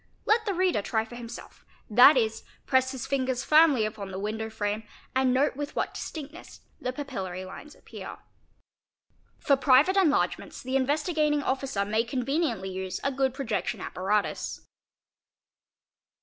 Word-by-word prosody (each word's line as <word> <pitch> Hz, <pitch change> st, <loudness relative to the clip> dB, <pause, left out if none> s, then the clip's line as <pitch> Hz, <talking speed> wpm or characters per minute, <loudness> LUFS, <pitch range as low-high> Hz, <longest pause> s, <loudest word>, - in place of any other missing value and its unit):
Let 440 Hz, +1 st, +2 dB
the 400 Hz, -, 0 dB
reader 365 Hz, -, +2 dB
try 220 Hz, +2 st, -1 dB
for 225 Hz, -, -13 dB
himself, 235 Hz, -1 st, -10 dB, 0.2 s
that 250 Hz, +6 st, +7 dB
is 220 Hz, -2 st, 0 dB, 0.2 s
press 260 Hz, -1 st, +3 dB
his 265 Hz, -2 st, -5 dB
fingers 260 Hz, -2 st, -1 dB
firmly 300 Hz, -7 st, +5 dB
upon 215 Hz, -2 st, -5 dB
the 190 Hz, -, -6 dB
window 220 Hz, +2 st, -3 dB
frame 210 Hz, 0 st, -2 dB, 0.3 s
and 260 Hz, -1 st, +3 dB
note 265 Hz, +3 st, +2 dB
with 290 Hz, +1 st, -5 dB
what -, -, -1 dB
distinctness 310 Hz, +1 st, -8 dB, 0.2 s
the 255 Hz, -, -2 dB
papillary 195 Hz, -10 st, -5 dB
lines 300 Hz, +10 st, -10 dB
appear®". -, -, -9 dB, 1.2 s
For 280 Hz, -, +3 dB
private 275 Hz, +8 st, +4 dB
enlargements 350 Hz, -6 st, +1 dB
the 260 Hz, +1 st, -3 dB
Investigating 295 Hz, +2 st, +1 dB
Officer 265 Hz, -7 st, -1 dB
may 220 Hz, +2 st, +1 dB
conveniently 245 Hz, -, -1 dB
use 185 Hz, 0 st, -4 dB
a 275 Hz, -, +1 dB
good 265 Hz, 0 st, +1 dB
projection 245 Hz, -7 st, -2 dB
apparatus. 200 Hz, +3 st, -2 dB
260 Hz, 140 wpm, -27 LUFS, 220-290 Hz, 1.2 s, that